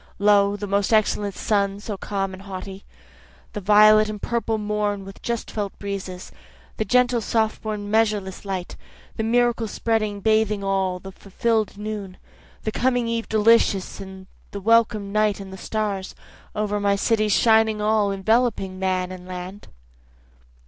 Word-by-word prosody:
Lo, 200 0 +4
the 205 - -5
most 200 +1 0
excellent 210 -2 +1
sun 200 -2 0
so 210 0 -5
calm 195 -1 -3
and 185 - -9
haughty, 195 0 -8 0.7
The 210 - -4
violet 215 +2 +6
and 210 -1 -5
purple 230 0 -1
morn 210 -1 -2
with 195 0 -11
just 235 -1 -3
felt 205 -2 -4
breezes, 195 -2 -6 0.5
The 220 - -1
gentle 245 +2 +3
soft 220 0 0
born 210 -2 -4
measureless 210 -4 0
light, 190 -3 -4 0.4
The - - -1
miracle 235 0 +2
spreading 215 -2 -1
bathing 215 -1 +1
all, 190 -2 0
the 190 +1 -9
fulfill'd 215 +3 -1
noon, 210 -3 -6 0.5
The 215 - -1
coming 245 0 +1
eve 230 0 -2
delicious, 215 -3 +3 0.5
the 200 - -6
welcome 215 -1 +2
night 215 -1 +1
and 195 -1 -9
the - - -6
stars, 200 -1 -3 0.4
Over 210 -1 -1
my 200 0 +2
cities 215 0 +1
shining 220 -1 +4
all, 210 -1 +2
enveloping 195 -1 0
man 185 -1 -1
and 180 -1 -9
land. 185 +2 -8
210 Hz, 150 wpm, -23 LUFS, 195-220 Hz, 0.7 s, violet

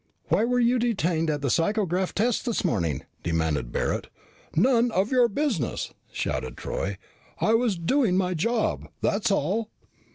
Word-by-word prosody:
"Why 225 - +3
were 245 +1 +1
you 245 +1 +3
detained 175 -9 +1
at 145 -2 -1
the 140 - +1
psychograph 185 0 +1
tests 230 +3 +1
this 235 -4 -1
morning?" 85 - 0 0.2
demanded 80 -7 -1
Barret. - - -1 0.5
"None 240 +6 +4
of 200 +1 0
your 250 -2 +5
business!" 225 - -2 0.2
shouted 65 -1 -3
Troy. 100 0 -3 0.4
"I 220 - +3
was 225 -4 +2
doing 190 +2 +2
my 185 -1 +1
job. 225 +7 0
That's 210 +3 +1
all." 200 +5 0
195 Hz, 150 wpm, -26 LUFS, 155-235 Hz, 0.5 s, your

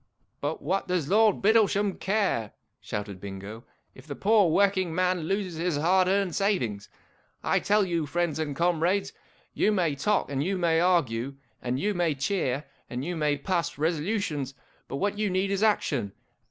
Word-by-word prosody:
" - - -46
But 145 +3 -3
what 190 +7 -1
does 180 -5 -1
Lord 215 0 +4
Bittlesham 205 -2 +3
care," 190 - 0 0.3
shouted 100 -3 -6
Bingo, 100 +4 -8
' - - -45
if 130 +3 -15
the 140 - -5
poor 205 -1 +4
working 190 -1 +2
man 180 -2 +1
loses 190 -2 -2
his 170 -2 0
hard 180 +4 +3
earned 195 -2 +1
savings? 125 - -1 0.5
I - - +2
tell 210 0 +2
you, 170 -4 -1
friends 170 -1 -1
and 150 -3 -2
comrades, 175 +4 +1 0.4
you 215 - +2
may 175 -7 +1
talk, 205 +4 0
and 140 0 0
you 190 +4 -1
may 165 -2 +2
argue, 140 -8 +1 0.3
and 125 +1 -2
you 205 +5 0
may 175 -5 +1
cheer, 140 -2 -1 0.3
and 125 +2 -4
you 175 +1 -3
may 150 -2 +1
pass 175 -2 -2
resolutions, 155 - -1 0.3
but - - -5
what 205 +7 -1
you 210 -1 +1
need 190 +1 0
is 200 0 0
Action 140 - +1
175 Hz, 175 wpm, -27 LUFS, 145-195 Hz, 0.5 s, Lord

